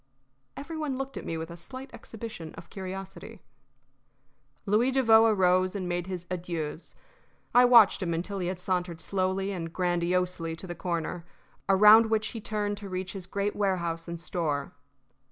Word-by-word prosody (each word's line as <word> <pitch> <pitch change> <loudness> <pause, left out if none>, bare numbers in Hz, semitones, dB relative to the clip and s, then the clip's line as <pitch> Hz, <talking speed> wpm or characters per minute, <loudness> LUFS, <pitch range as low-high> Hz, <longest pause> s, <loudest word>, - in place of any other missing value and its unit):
Every 320 +4 -6
one 300 -4 -2
looked 270 +1 -5
at - - -6
me 165 - -2
with 160 +1 -6
a - - -7
slight 260 +10 -9
exhibition 215 -8 -8
of - - -12
curiosity. 195 +3 -7 1.3
Louis 215 +5 +3
Devoe 225 -4 +5
arose 185 -2 +3
and 185 -3 -3
made 175 0 -2
his 180 -2 -5
adieus. 170 -3 -4 0.6
I 245 +1 +7
watched 235 -5 +7
him 175 -2 -1
until 185 +4 -3
he 180 - -2
had 185 0 -2
sauntered 180 -2 -2
slowly 190 +2 -1
and 165 -4 -5
grandiosely 175 -1 0
to 165 - -9
the 175 - -5
corner, 170 0 -3 0.5
around 210 +3 +8
which 220 -1 +1
he 225 - -7
turned 205 -1 -2
to 200 -1 -8
reach 185 0 -4
his 190 -3 -7
great 200 +2 -2
warehouse 170 -5 -1
and 170 0 -5
store. 155 -4 -2
185 Hz, 165 wpm, -28 LUFS, 175-210 Hz, 1.3 s, around